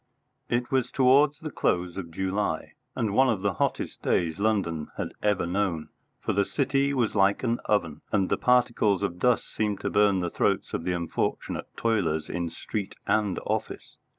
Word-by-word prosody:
It 120 +3 -1
was 130 -2 +1
towards 140 +3 +4
the 155 -2 -5
close 90 -7 0
of 90 -4 -5
July, 95 0 -2 0.2
and 105 -3 -1
one 130 +4 +5
of 105 -5 -1
the 100 -2 +1
hottest - - -2
days 85 0 0
London 95 -8 0
had - - -4
ever 105 -4 +1
known, 90 -3 -1 0.3
for - - -2
the 100 - +3
City 140 +3 +1
was 125 -5 +1
like 100 +2 +3
an 120 -1 +1
oven, 85 -8 0
and 95 -3 +2
the - - +1
particles 120 -5 +2
of 90 -3 -2
dust 125 +3 +2
seemed 105 -2 -1
to - - -2
burn 100 -2 +3
the 85 -1 -2
throats - - 0
of 80 - -3
the 90 - 0
unfortunate 85 -2 -2
toilers 100 -9 0
in 85 -1 -2
street 100 +4 -5
and 105 -3 +1
office. - - -4
100 Hz, 180 wpm, -27 LUFS, 90-120 Hz, 0.3 s, one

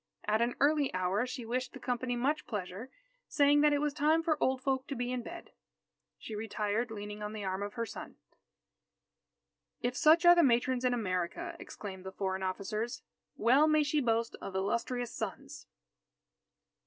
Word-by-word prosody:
At 215 +2 +2
an 240 +1 +1
early 290 -1 +3
hour 185 +6 0
she 250 -1 -6
wished 255 +3 -2
the - - -9
company 245 0 -2
much 275 +6 0
pleasure, 205 +3 -5 0.4
saying 290 0 +4
that 300 0 +5
it 290 - +3
was 295 0 0
time 310 +2 +2
for 325 -2 +2
old 260 0 +1
folk 265 -1 0
to 280 - -4
be 245 0 -2
in 250 -1 -2
bed. - - -9 0.7
She 220 - -8
retired 215 +2 -2
leaning 210 -1 -7
on 210 0 -4
the 215 -2 -5
arm 190 0 -2
of 205 0 -4
her 230 -1 -1
son. 225 - -8 1.6
"If 245 +1 -2
such 325 +4 +5
are 345 - +10
the 345 - +5
matrons 250 -2 +2
in 250 -1 +2
America," 210 - -2
exclaimed 190 -3 -8
the 190 - -6
foreign 190 0 -2
officers, 205 +5 -3 0.3
"well 260 +7 +5
may 310 -1 +4
she 295 +1 +1
boast 230 -2 0
of 195 - -6
illustrious 235 +5 -1
sons!" - - -6
240 Hz, 175 wpm, -32 LUFS, 210-280 Hz, 1.6 s, are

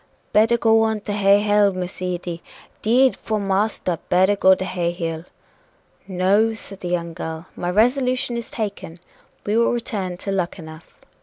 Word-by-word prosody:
"Better 225 +3 +4
go 225 -1 +4
on 220 -1 0
to 205 - -4
Hay 200 0 +4
Hill, 205 -1 +3
Miss 185 0 -6
Edy! 175 -2 -4 0.4
'Deed, 250 +4 +3
'fore 215 -1 -3
marster, 195 -3 -1
better 190 +3 +4
go 190 -1 +5
to 185 - -4
Hay 175 -2 -1
Hill." 165 -2 -4 0.8
"No," 200 +4 +2
said 200 -3 -10
the 180 - -6
young 170 -1 -2
girl, 160 +1 -6
"my 175 - -3
resolution 250 +4 +1
is 235 -1 -5
taken 200 -6 -5 0.5
we 210 - 0
will 230 0 +3
return 205 -7 -3
to 195 - -4
Luckenough." 170 -4 -6
195 Hz, 160 wpm, -21 LUFS, 180-220 Hz, 0.8 s, go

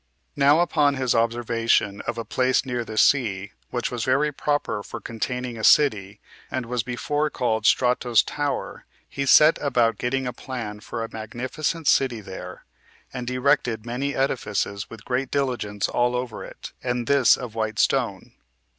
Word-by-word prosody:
6. - - -35
Now 145 +3 +5
upon 150 -5 +2
his 130 -2 0
observation 115 -3 +1
of 120 - -2
a 115 - -4
place 130 +4 +1
near 125 -2 -2
the 110 -1 -8
sea, 105 -8 +2 0.2
which 120 -1 -2
was 120 -2 -3
very 140 +4 +2
proper 145 -6 -1
for 115 - -8
containing 120 +2 -4
a - - -6
city, 105 -10 +4 0.3
and 130 - -3
was 125 0 -1
before 145 +5 -1
called 120 -6 0
Strato's 125 -2 +3
Tower, 145 -2 -4 0.2
he 140 0 -4
set 155 +4 +7
about 120 -6 +1
getting 135 +2 -1
a 125 - -3
plan 115 -5 -6
for 115 +2 -5
a 115 - -8
magnificent 130 +8 -4
city 130 -5 +3
there, 95 -2 -9 0.5
and 125 -1 -4
erected 125 -3 +1
many 130 +4 -3
edifices 105 -6 -1
with 115 -1 -12
great 125 +1 -1
diligence 120 -7 -1
all 120 0 +1
over 125 -2 -4
it, - - -10
and 125 -1 -2
this 140 -1 +5
of 125 -4 -7
white 110 -1 -2
stone. - - 0
125 Hz, 165 wpm, -24 LUFS, 115-135 Hz, 0.5 s, set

